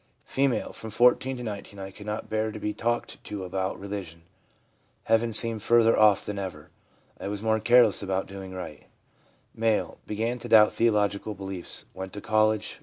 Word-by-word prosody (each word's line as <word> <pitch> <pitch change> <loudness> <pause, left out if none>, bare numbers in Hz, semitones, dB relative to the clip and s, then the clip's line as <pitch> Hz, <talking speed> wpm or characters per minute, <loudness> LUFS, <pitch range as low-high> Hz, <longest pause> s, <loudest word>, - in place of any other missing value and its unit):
F. - - -15
c 140 +1 +3 0.2
From 110 - -8
14 125 +3 +3
to 125 - -6
19 100 -2 -7
I 95 0 -7
could 105 +2 -12
not 105 +1 -4
bear 110 0 -1
to - - -7
be 105 - -2
talked 120 +1 -2
to 105 -2 -6
about 95 +1 -3
religion. 95 -5 -7 0.8
Heaven 115 +1 +2
seemed 110 0 +2
further 115 0 +4
off 105 -2 +4
than 105 -1 -4
ever. 95 -2 -7 0.5
I - - -5
was 100 +1 -4
more 110 0 +2
careless 120 -2 +5
about 95 -1 -1
doing 95 -1 -9
right/ 95 0 -8 0.7
M. 110 -1 +1
' - - -38
Began 115 +4 -2
to - - -8
doubt 105 -1 +7
theological 105 -2 +1
beliefs. 95 -2 -5
Went 95 0 -7
to 105 - -6
college. 110 0 +1
105 Hz, 180 wpm, -27 LUFS, 100-115 Hz, 0.8 s, doubt